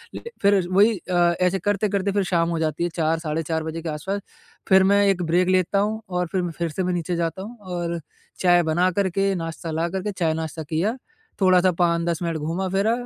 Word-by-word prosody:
ल - - -6 0.2
फिर 200 -1 +5
वही 205 +3 +4
अ, 180 - +1 0.3
ऐसे 180 +1 +2
करते-करते 200 0 0
फिर 200 0 +1
शाम 170 0 +2
हो 165 -1 -1
जाती 155 +1 -1
है 175 - 0
4 160 -1 +1
साढ़े 160 0 -2
4 160 0 -2
बजे 160 +1 -5
के 165 - -4
आस-पास 190 +7 -3 0.5
फिर 190 0 +6
मैं 200 0 +4
एक 190 -2 +2
ब्रेक 175 +3 +2
लेता 185 +1 +2
हूँ 215 +2 -1
और 180 0 -1
फिर 185 -2 +1
म 175 - -3
फिर 170 - 0
से 185 +5 -3
मैं 180 0 0
नीचे 175 0 -2
जाता 170 +2 -2
हूँ 225 +5 -9
और 175 -3 -3 0.4
चाय 175 -1 +4
बना 175 +3 +2
कर 190 +1 0
के 195 +2 +1
नाश्ता 165 -1 -5
ला 165 +2 0
कर 190 +2 -3
के 210 - -2
चाय 170 -5 0
नाश्ता 160 0 -4
किया 165 - -1 0.4
थोड़ा-सा 185 -1 +5
5-10 170 -1 +1
मिनट 165 -2 -1
घूमा 165 +5 -2
फिरा 195 +4 +1
175 Hz, 225 wpm, -23 LUFS, 165-195 Hz, 0.5 s, फिर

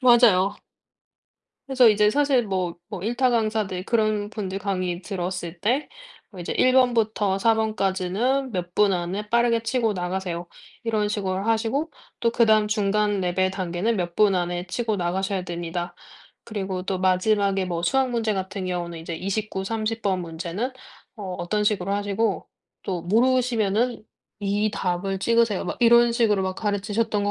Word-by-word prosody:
맞아요. 235 -7 +5 1.1
그래서 255 -3 +5
이제 210 0 +4
사실 275 -4 +2
뭐 180 -3 -2
뭐 180 - -6
일타 240 +4 +1
강사들 215 -5 0
그런 215 -2 0
분들 195 -3 -4
강의 185 -2 -2
들었을 180 -3 -4
때 250 +8 0 0.4
뭐 185 -4 -10
이제 170 - -3
1 255 - +3
번부터 220 -6 +2
4 225 +2 +4
번까지는 220 +5 0
몇 175 -1 -4
분 205 -2 +4
안에 185 +4 -3
빠르게 235 -1 +3
치고 230 -2 0
나가세요. 180 -1 -3 0.4
이런 215 -2 0
식으로 195 -2 -2
하시고 230 +8 0 0.3
또 230 - +2
그다음 220 -2 +4
중간 210 -1 +1
레벨 185 +1 +1
단계는 190 +4 -1
몇 175 -2 -3
분 205 -2 +4
안에 175 0 -2
치고 225 0 -1
나가셔야 190 +2 -1
됩니다. 175 0 -4 0.5
그리고 190 -4 -4
또 190 0 -2
마지막에 195 +1 +2
뭐 170 -2 -3
수학 260 +8 +2
문제 225 -3 0
같은 190 0 -4
경우는 175 -2 -3
이제 165 +1 -6
29, 195 +2 -3
30 225 +2 -2
번 190 -2 0
문제는 175 +8 -4 0.4
어 210 - -8 0.2
어떤 210 +4 -1
식으로 200 -2 0
하시고 205 0 -1 0.4
또 180 -3 -3
모르시면은 235 +1 +1 0.4
이 205 +1 0
답을 190 0 -2
찍으세요. 230 -3 +2
막 - - -4
이런 235 0 +6
식으로 220 -5 +2
막 185 0 -2
가르치셨던 210 +1 -1
것 205 - +1
205 Hz, 310 characters per minute, -24 LUFS, 185-225 Hz, 1.1 s, 이런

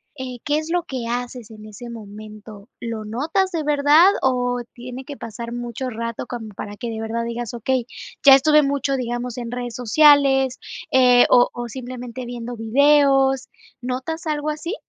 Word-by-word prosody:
eh, 260 -3 -6
¿qué 295 +1 +1
es 315 +1 -7
lo 350 -1 +1
que 255 -6 -5
haces 245 -1 -4
en 215 -1 -12
ese 215 +3 -10
momento? 215 0 -11
¿Lo 230 -2 -5
notas 310 - -1
de 330 -2 -2
verdad? 295 +3 +5 0.2
O 245 -2 0
tiene 250 +2 -8
que 285 0 -8
pasar 235 0 -7
mucho 240 +1 -5
rato 230 0 -5
como 230 -3 -6
para 205 +1 -7
que 240 0 -5
de 220 0 -5
verdad 230 +1 -3
digas: 235 0 -5
"Okey, 245 +1 -1 0.4
ya 270 -1 +10
estuve 300 +2 +5
mucho 275 -1 0
digamos, 240 -1 -4
en 235 -1 -6
redes 245 -1 -5
sociales, 270 +1 +4 0.3
eh, 250 -1 +6
o 245 0 +6
o 240 0 -6
simplemente 250 0 -7
viendo 240 0 -6
videos", 270 +3 +3 0.3
¿notas 260 +7 -4
algo 305 0 -1
así? 330 +6 -5
250 Hz, 170 wpm, -21 LUFS, 235-275 Hz, 0.4 s, ya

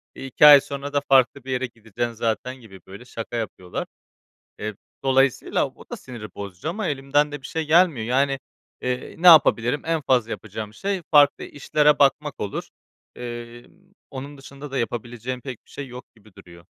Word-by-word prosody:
iii, 135 - -7
2 135 - +4
ay 145 -2 +10
sonra 140 +1 -6
da 145 - +2
farklı 135 0 +4
bir 130 - -6
yere 130 0 0
gideceksin 115 0 -5
zaten." 115 +3 -2
gibi 110 -7 -14
böyle 100 +6 -11
şaka 115 -1 -7
yapıyorlar. 95 -5 -5 0.7
Eee, 110 0 -4 0.3
dolayısıyla 135 -1 +2
o - - -17
da - - -4
siniri 120 -4 -9
bozucu 100 - -7
ama 200 +4 -3
elimden 145 +1 +1
de 145 - -6
bir - - -7
şey 160 -1 -3
gelmiyor. 160 -7 +3
Yani, 135 +2 +1 0.4
eee, 125 0 -3
ne 175 - +1
yapabilirim? 145 -5 +6
En 165 -1 0
fazla 125 -5 +1
yapacağım 110 0 -6
şey 195 - -3
farklı 145 -2 +5
işlere 150 +1 +2
bakmak 145 +1 +2
olur. 100 - -4 0.5
Emm, 120 0 -8 0.4
onun 140 +1 -8
dışında 140 +1 -10
da 135 - -2
yapabileceğim 120 +1 -4
pek 130 -3 -7
bir - - -23
şey 140 - -7
yok 125 0 -9
gibi 110 -2 -21
duruyor. 85 -1 -15
130 Hz, 175 wpm, -23 LUFS, 115-145 Hz, 0.7 s, ay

